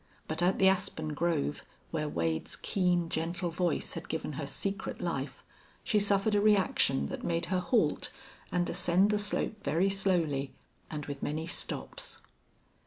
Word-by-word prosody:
But 160 Hz, +2 st, -2 dB
at 180 Hz, +2 st, +3 dB
the 190 Hz, -, +5 dB
aspen 180 Hz, -5 st, +1 dB
grove, 155 Hz, -2 st, 0 dB, 0.3 s
where 150 Hz, -1 st, -1 dB
Wade's 80 Hz, -, -1 dB
keen, 180 Hz, -3 st, +1 dB
gentle 170 Hz, +2 st, -2 dB
voice 175 Hz, -1 st, 0 dB
had -, -, -7 dB
given 160 Hz, -1 st, -3 dB
her 140 Hz, 0 st, -4 dB
secret 195 Hz, +8 st, -2 dB
life, -, -, -3 dB, 0.4 s
she 210 Hz, -, +3 dB
suffered 200 Hz, +1 st, +3 dB
a 205 Hz, -, +4 dB
reaction 195 Hz, -, +3 dB
that -, -, -5 dB
made 170 Hz, 0 st, 0 dB
her 185 Hz, -, +3 dB
halt 180 Hz, -4 st, +1 dB, 0.4 s
and 175 Hz, -1 st, +1 dB
ascend 185 Hz, +4 st, +3 dB
the 210 Hz, -, +2 dB
slope 210 Hz, 0 st, -1 dB
very 185 Hz, +3 st, +2 dB
slowly 170 Hz, -8 st, +1 dB, 0.3 s
and 150 Hz, -2 st, -4 dB
with 140 Hz, -1 st, -6 dB
many 155 Hz, +2 st, -2 dB
stops. -, -, -2 dB
175 Hz, 155 wpm, -31 LUFS, 155-195 Hz, 0.4 s, the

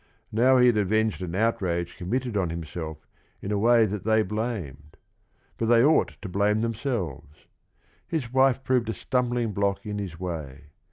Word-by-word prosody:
Now 125 Hz, +4 st, +4 dB
he 125 Hz, -, +6 dB
had 120 Hz, -3 st, +4 dB
avenged 110 Hz, +1 st, +1 dB
an 90 Hz, -1 st, -4 dB
outrage 95 Hz, -5 st, 0 dB
committed 120 Hz, +5 st, -3 dB
on 95 Hz, -4 st, +1 dB
himself 80 Hz, -1 st, -6 dB, 0.3 s
in 100 Hz, -, -5 dB
a 105 Hz, -, +1 dB
way 115 Hz, +1 st, +5 dB
that 105 Hz, -2 st, -4 dB
they 110 Hz, 0 st, +3 dB
blamed, 90 Hz, -, -5 dB, 0.6 s
but 115 Hz, -, 0 dB
they 115 Hz, 0 st, +5 dB
ought 155 Hz, +2 st, +2 dB
to -, -, -4 dB
blame 100 Hz, +3 st, +1 dB
themselves. 110 Hz, -, -4 dB, 0.6 s
His 130 Hz, -7 st, -3 dB
wife 135 Hz, 0 st, +3 dB
proved 125 Hz, -3 st, +1 dB
a 110 Hz, -, -2 dB
stumbling 120 Hz, -3 st, -1 dB
block 100 Hz, 0 st, -1 dB
in 105 Hz, -1 st, -4 dB
his 90 Hz, -5 st, -6 dB
way. 75 Hz, -5 st, -6 dB
105 Hz, 165 wpm, -26 LUFS, 90-120 Hz, 0.6 s, he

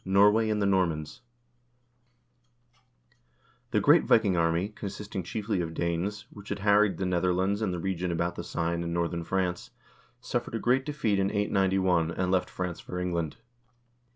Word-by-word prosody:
Normandy 105 Hz, +3 st, +4 dB
and 105 Hz, -1 st, 0 dB
the 100 Hz, -, +1 dB
Normans 85 Hz, -5 st, 0 dB, 2.5 s
The -, -, +2 dB
great -, -, +5 dB
Viking 105 Hz, -5 st, +3 dB
army, 85 Hz, +3 st, +1 dB
consisting 105 Hz, -2 st, -6 dB
chiefly 105 Hz, +2 st, -2 dB
of 80 Hz, -1 st, -5 dB
Danes, 90 Hz, +5 st, -2 dB
which 100 Hz, -1 st, -12 dB
had -, -, -2 dB
harried 100 Hz, 0 st, +3 dB
the 95 Hz, -, -2 dB
Netherlands 90 Hz, +3 st, +1 dB
and 105 Hz, -4 st, 0 dB
the 90 Hz, -, -3 dB
region 90 Hz, 0 st, -2 dB
about 85 Hz, +1 st, -1 dB
the -, -, -6 dB
Seine 85 Hz, 0 st, -2 dB
in 85 Hz, 0 st, -3 dB
northern 85 Hz, 0 st, -1 dB
France, 90 Hz, 0 st, -2 dB, 0.5 s
suffered -, -, -3 dB
a -, -, -1 dB
great 130 Hz, +2 st, +2 dB
defeat 115 Hz, -9 st, 0 dB
in 95 Hz, 0 st, +1 dB
891, 95 Hz, -4 st, +1 dB
and 90 Hz, +1 st, -1 dB
left 95 Hz, -1 st, +1 dB
France 90 Hz, -2 st, -4 dB
for 90 Hz, -, -6 dB
England. 85 Hz, -4 st, -2 dB
95 Hz, 155 wpm, -28 LUFS, 85-100 Hz, 2.5 s, great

